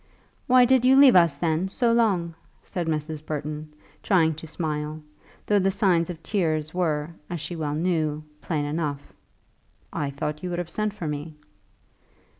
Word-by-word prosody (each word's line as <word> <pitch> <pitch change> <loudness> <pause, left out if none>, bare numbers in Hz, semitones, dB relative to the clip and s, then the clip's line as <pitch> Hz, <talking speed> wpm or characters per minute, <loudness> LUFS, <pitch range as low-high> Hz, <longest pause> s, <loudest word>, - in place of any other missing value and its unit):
"Why 255 -1 +6
did 255 0 +4
you 260 +1 +6
leave 275 -4 +8
us, 170 -5 +5
then, 160 +4 0
so 235 +4 +1
long?" 195 -8 +2 0.3
said 175 -3 -4
Mrs. 155 -1 -3
Burton, 150 0 -5 0.3
trying 165 -5 +3
to 160 +1 -9
smile, 155 -1 -3 0.5
though 205 -1 +3
the 195 0 +2
signs 180 -4 +2
of 165 -2 -7
tears 155 -6 -1
were, 160 -3 -1 0.2
as 175 - -4
she 155 +4 -5
well 150 -3 -2
knew, 155 -2 0 0.2
plain 150 -4 -2
enough. 145 -2 -3 0.8
"I 145 - -2
thought 150 +2 -4
you 180 - -4
would 175 - -3
have 175 -1 -4
sent 215 0 -1
for 165 - -5
me." 150 +1 -5
160 Hz, 165 wpm, -25 LUFS, 150-185 Hz, 0.8 s, leave